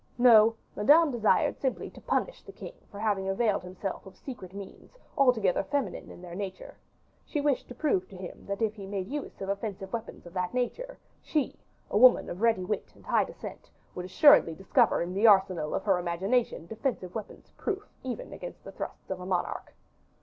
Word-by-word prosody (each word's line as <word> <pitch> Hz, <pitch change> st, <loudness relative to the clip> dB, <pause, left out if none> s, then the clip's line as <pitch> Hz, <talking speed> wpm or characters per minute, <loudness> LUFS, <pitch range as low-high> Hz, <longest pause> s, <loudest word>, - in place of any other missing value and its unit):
No, 230 Hz, -2 st, +7 dB, 0.2 s
Madame 295 Hz, +8 st, +5 dB
desired 225 Hz, -4 st, +2 dB
simply 265 Hz, -2 st, -2 dB
to -, -, -14 dB
punish -, -, -1 dB
the -, -, -12 dB
king -, -, -9 dB, 0.2 s
for 200 Hz, -, -10 dB
having 200 Hz, -3 st, 0 dB
availed 205 Hz, +1 st, +1 dB
himself 185 Hz, +2 st, -5 dB
of 190 Hz, -, -13 dB
secret 225 Hz, -9 st, -8 dB
means 200 Hz, -, -11 dB, 0.2 s
altogether 240 Hz, -, +3 dB
feminine 275 Hz, +8 st, -3 dB
in 175 Hz, -, -12 dB
their 175 Hz, -1 st, -8 dB
nature; 190 Hz, 0 st, -6 dB, 0.5 s
she 300 Hz, -, -3 dB
wished 285 Hz, -2 st, +1 dB
to 245 Hz, -, -9 dB
prove 215 Hz, -, +1 dB
to 190 Hz, -, -11 dB
him 180 Hz, -1 st, -9 dB
that 200 Hz, +3 st, -2 dB
if 215 Hz, -1 st, +1 dB
he 200 Hz, -3 st, -9 dB
made 195 Hz, -2 st, -3 dB
use 290 Hz, +2 st, -5 dB
of 195 Hz, -, -3 dB
offensive 200 Hz, -1 st, -4 dB
weapons 230 Hz, -5 st, -5 dB
of 175 Hz, -, -11 dB
that 180 Hz, +3 st, -2 dB
nature, 480 Hz, -, -2 dB, 0.2 s
she, 295 Hz, -5 st, -1 dB, 0.4 s
a 205 Hz, -, +3 dB
woman 250 Hz, +1 st, +6 dB
of 180 Hz, -, -7 dB
ready 225 Hz, -5 st, +3 dB
wit 210 Hz, -, -3 dB
and -, -, -19 dB
high -, -, +3 dB
descent, -, -, -9 dB, 0.2 s
would 180 Hz, -, -5 dB
assuredly 185 Hz, -, +6 dB
discover 195 Hz, -, +2 dB
in 175 Hz, +1 st, -5 dB
the 205 Hz, +4 st, +4 dB
arsenal 190 Hz, -6 st, +4 dB
of -, -, -2 dB
her 195 Hz, -4 st, +3 dB
imagination 180 Hz, +3 st, 0 dB
defensive 220 Hz, -3 st, -3 dB
weapons 220 Hz, -2 st, -8 dB
proof 405 Hz, 0 st, -3 dB
even 255 Hz, -2 st, -5 dB
against -, -, -8 dB
the -, -, -9 dB
thrusts -, -, -7 dB
of 190 Hz, -, -3 dB
a 180 Hz, -, -7 dB
monarch. 185 Hz, -2 st, -2 dB
205 Hz, 195 wpm, -29 LUFS, 185-250 Hz, 0.5 s, No